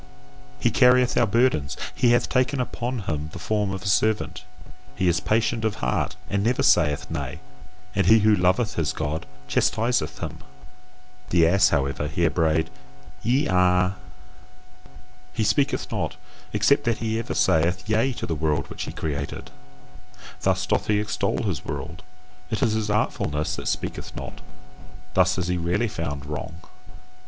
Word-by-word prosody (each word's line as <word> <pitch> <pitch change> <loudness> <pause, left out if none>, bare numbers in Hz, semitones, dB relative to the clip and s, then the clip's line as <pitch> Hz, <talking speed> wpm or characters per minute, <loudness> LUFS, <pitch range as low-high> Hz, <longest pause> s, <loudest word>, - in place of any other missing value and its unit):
He 120 - +2
carrieth 125 +1 +4
our 120 - +3
burdens, 110 - +1 0.2
he 120 - +2
hath 120 0 +3
taken 130 +1 +1
upon 125 -1 -3
him 80 -5 -3
the - - -7
form 105 +3 -1
of 95 0 -5
a - - -4
servant, 105 +1 +1 0.5
he 95 - 0
is 85 0 +3
patient 115 +1 0
of 110 -1 0
heart 60 +2 -1
and 100 0 0
never 120 +3 +1
saith 75 -5 +3
Nay; 70 +2 -4 0.5
and 100 -2 +1
he 110 - +8
who 110 0 +4
loveth 95 +4 +2
his 80 -2 0
God 75 +1 -3 0.2
chastiseth 120 +2 +1
him. - - -6 0.9
The 85 -1 +4
ass, 100 +4 +4
however, 70 +1 0
here 85 +2 +1
brayed 80 0 +1 0.5
YE 130 +6 +2
A. 90 +1 +3 1.4
He 110 - 0
speaketh 135 +7 +1
not: - - -2 0.4
except 140 - +3
that 115 -2 +1
he 110 0 -1
ever 115 - -4
saith 90 +2 +2
Yea 110 +5 +2
to - - -5
the 80 - -2
world 75 -1 -1
which - - -5
he - - -6
created: 70 -2 -5 0.9
thus 95 -1 +1
doth - - 0
he 105 -1 +2
extol 105 - -1
his - - -2
world. 75 +4 -6 0.5
It 110 - -1
is 115 -4 +2
his 110 -1 -1
artfulness 75 -7 -1
that - - -5
speaketh - - -3
not: - - -7 0.7
thus 90 0 +3
is 90 -1 -1
he 90 0 0
rarely 90 +7 0
found 70 -8 -4
wrong. 75 +2 -5
95 Hz, 160 wpm, -24 LUFS, 80-110 Hz, 1.4 s, he